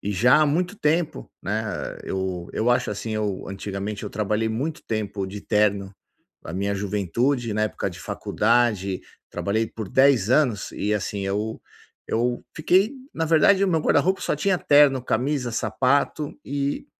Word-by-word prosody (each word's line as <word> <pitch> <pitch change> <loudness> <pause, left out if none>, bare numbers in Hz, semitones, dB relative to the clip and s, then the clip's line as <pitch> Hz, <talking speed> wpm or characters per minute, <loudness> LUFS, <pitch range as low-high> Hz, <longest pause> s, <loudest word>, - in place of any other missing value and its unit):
e 100 - -3
já 120 +8 +5
há 155 - +4
muito 180 +7 0
tempo, 160 +2 0
né. 105 +3 -1 0.4
Eu 95 -2 -3
eu 115 +3 +1
acho, 120 0 +2
assim, 105 +2 -4
eu 105 -3 -2
antigamente, 100 +2 -5
eu 105 - -5
trabalhei 105 +2 0
muito 140 +9 -3
tempo 105 -3 -2
de 100 +2 -7
terno. 100 -2 +1 0.5
Na 80 - -8
minha 100 +3 -1
juventude, 105 +5 -1
na 105 +1 0
época 110 - -2
de - - -11
faculdade, 105 -4 +1 0.3
trabalhei 110 +3 -1
por 110 -2 -7
10 130 -5 +4
anos 125 -8 +2
e, 105 +1 -1
assim, 105 0 -3
eu 105 +3 -2 0.5
eu 120 +2 0
fiquei 190 - +3 0.2
na 165 - -1
verdade, 165 +5 +4
o 195 - +1
meu 165 -3 +2
guarda-roupa 180 +6 +2
só - - -1
tinha 190 +4 +1
terno, 145 -5 +5
camisa, 125 +1 0
sapato 130 +7 0
e 140 - -2
110 Hz, 160 wpm, -24 LUFS, 100-145 Hz, 0.5 s, já